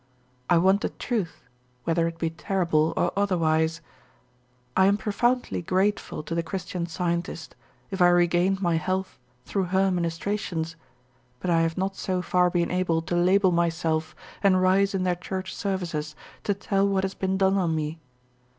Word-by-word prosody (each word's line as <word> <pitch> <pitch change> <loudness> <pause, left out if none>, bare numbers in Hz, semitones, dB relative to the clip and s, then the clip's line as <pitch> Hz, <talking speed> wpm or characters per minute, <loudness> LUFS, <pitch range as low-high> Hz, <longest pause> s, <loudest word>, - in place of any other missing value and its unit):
I 175 - +5
want 190 +4 +4
the - - -1
truth, 215 - -3 0.4
whether 165 0 +1
it 165 0 -5
be 165 -1 -1
terrible 170 -3 +1
or - - +2
otherwise. 165 -4 +1 0.9
I 190 - +5
am 200 +1 +3
profoundly 240 +3 0
grateful 190 -1 0
to 165 - -5
the 170 - +1
Christian 180 0 -4
Scientist, 170 -1 -3 0.4
if 190 -1 -3
I 175 - +8
regained 175 +2 +3
my 170 -2 +2
health 185 +4 -2 0.3
through 195 -2 -1
her 190 +2 +2
ministrations, 170 -1 -2 0.6
but 180 - -1
I 165 -1 +4
have 165 +1 0
not 190 +1 -1
so 185 -1 -2
far 180 -1 +3
been 170 -1 0
able 180 -3 +1
to 175 +1 -2
label 185 +2 +4
myself 165 -2 0 0.3
and 190 -2 +4
rise 195 +2 +3
in 185 - 0
their 180 -1 +2
church 185 +1 -5
services 170 -6 -3 0.3
to 205 - +1
tell 200 0 +1
what 195 -1 +1
has 195 0 -2
been 190 0 -1
done 190 0 +3
on 170 -3 +1
me. 155 +1 -3
180 Hz, 165 wpm, -26 LUFS, 165-195 Hz, 0.9 s, I